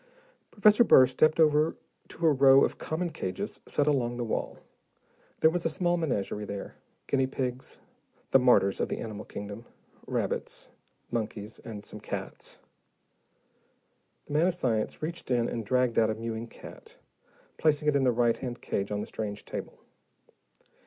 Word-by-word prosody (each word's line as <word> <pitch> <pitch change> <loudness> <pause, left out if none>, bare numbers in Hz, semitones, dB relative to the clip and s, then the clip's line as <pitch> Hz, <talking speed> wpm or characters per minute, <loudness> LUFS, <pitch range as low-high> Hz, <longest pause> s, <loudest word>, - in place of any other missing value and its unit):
Professor 210 +2 +5
Burr 130 - +7
stepped 155 +5 +2
over 155 0 +4 0.3
to 170 - -4
a 155 - +6
row 135 0 +6
of - - -5
common 170 +2 -3
cages 95 -11 -5
set 145 - +1
along 125 -5 +1
the 120 - -2
wall. 115 - -3 0.8
There 160 - +6
was 175 0 -1
a - - +1
small 175 +2 0
menagerie 115 - -2
there, 100 -1 -6 0.3
guinea 135 -2 +1
pigs 130 -1 -4 0.5
the 135 - +7
martyrs 120 -6 +4
of - - -1
the - - -2
animal 105 -2 -6
kingdom 100 +2 -7 0.4
rabbits, - - -3 0.4
monkeys, 110 -2 -4
and 105 -2 -9
some - - -9
cats. - - -7 1.7
The - - -8
man 155 +4 +4
of 185 - 0
science 115 -6 -1
reached 165 -2 -5
in 120 -2 +2
and 115 - -3
dragged 125 +2 +2
out 110 -1 +3
a 110 - -1
mewing 115 +1 -5
cat, - - -13 0.6
placing 150 -1 +2
it 150 - +3
in 140 - +3
the 125 - +4
right 120 0 +2
hand 125 -2 -5
cage 100 +1 -3
on 105 0 -1
the - - -4
strange 105 -1 -5
table. - - -7
125 Hz, 160 wpm, -28 LUFS, 110-155 Hz, 1.7 s, Burr